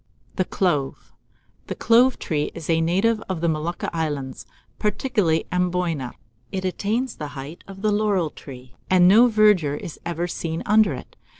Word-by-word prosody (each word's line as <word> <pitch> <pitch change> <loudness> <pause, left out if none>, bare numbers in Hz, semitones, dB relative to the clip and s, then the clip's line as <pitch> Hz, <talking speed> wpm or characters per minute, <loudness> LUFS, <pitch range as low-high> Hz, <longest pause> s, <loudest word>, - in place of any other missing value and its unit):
] - - -35
THE 185 - +1
CLOVE. 150 -10 -1 0.5
The - - -4
clove 245 +3 +4
tree 150 -3 -2
is 165 -1 -3
a 165 0 +2
native 195 +7 +1
of 185 -3 -2
the 170 - 0
Molucca 160 +2 -2
Islands, 145 -5 -3 0.3
particularly 210 -7 0
Amboyna, 180 -7 -1 0.4
and 190 -1 -3
attains 215 +7 -2
the 150 - -5
height 140 +5 -8
of 195 +1 -8
a 210 - +3
laurel 205 -6 +1
tree, 125 -3 -12 0.2
and 180 -1 +6
no 225 +6 +7
verdure 210 -10 +3
is 165 - -8
ever 170 0 -2
seen 165 -1 -4
under 215 +1 +4
it. - - -11
175 Hz, 165 wpm, -23 LUFS, 160-210 Hz, 0.5 s, no